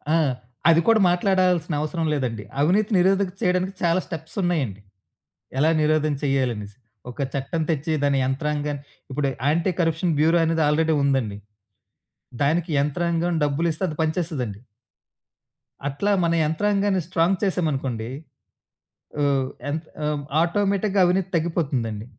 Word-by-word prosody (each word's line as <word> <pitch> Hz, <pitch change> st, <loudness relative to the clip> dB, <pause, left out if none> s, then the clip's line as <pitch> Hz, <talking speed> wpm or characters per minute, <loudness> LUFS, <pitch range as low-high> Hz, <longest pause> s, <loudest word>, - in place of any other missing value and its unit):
ఆ! -, -, +4 dB, 0.5 s
అది 165 Hz, 0 st, +6 dB
కూడా 225 Hz, -1 st, +5 dB
మాట్లాడాల్సిన 180 Hz, -2 st, +2 dB
అవసరం 160 Hz, +2 st, -2 dB
లేదండి. 120 Hz, -7 st, -2 dB, 0.2 s
అవినీతి 195 Hz, +8 st, +2 dB
నిరోధకం 190 Hz, +1 st, +2 dB
చేయడానికి 180 Hz, +1 st, +1 dB
చాలా 170 Hz, +1 st, +3 dB
స్టెప్సున్నయండి, 160 Hz, -, -2 dB, 0.8 s
ఎలా 155 Hz, +3 st, +4 dB
నిరోధం 155 Hz, 0 st, +2 dB
చేయాలనేసి. 120 Hz, -7 st, -1 dB, 0.3 s
ఒక -, -, -17 dB, 0.2 s
చట్టం 140 Hz, +4 st, -2 dB
తెచ్చి, 160 Hz, 0 st, 0 dB
దాని 140 Hz, -1 st, +2 dB
యంత్రాంగాన్ని 145 Hz, +1 st, -2 dB, 0.3 s
ఇప్పుడు 140 Hz, +1 st, 0 dB, 0.2 s
యాంటీ 165 Hz, +5 st, +2 dB
కరప్షన్ 165 Hz, 0 st, +1 dB
బ్యూరో 165 Hz, +3 st, +4 dB
అనేది 160 Hz, 0 st, +1 dB
ఆల్రెడీ 160 Hz, +1 st, +2 dB
ఉందండి. 130 Hz, -7 st, 0 dB, 1.1 s
దానికి 165 Hz, +4 st, +1 dB
యంత్రాంగం 170 Hz, +3 st, 0 dB
డబ్బులిస్తే 160 Hz, +4 st, -1 dB
అది 155 Hz, -, -6 dB
పనిచేస్తదండి. 155 Hz, -, -2 dB, 1.3 s
అట్లా 145 Hz, +9 st, -1 dB
మన 170 Hz, 0 st, +2 dB
యంత్రాంగాన్ని 200 Hz, +4 st, +1 dB
స్ట్రాంగ్ 180 Hz, +2 st, +1 dB
చేసామనుకోండి. 135 Hz, -, -1 dB, 1.1 s
అవ్ 140 Hz, -2 st, +2 dB, 0.2 s
యంత్ 155 Hz, +2 st, -3 dB, 0.2 s
ఆహ్, 150 Hz, -1 st, -1 dB, 0.2 s
ఆటోమేటిక్‌గా 200 Hz, +3 st, +1 dB
అవినీతి 185 Hz, +1 st, +1 dB
తగ్గిపోతుందండి. 135 Hz, -10 st, -1 dB
160 Hz, 115 wpm, -23 LUFS, 140-180 Hz, 1.3 s, అది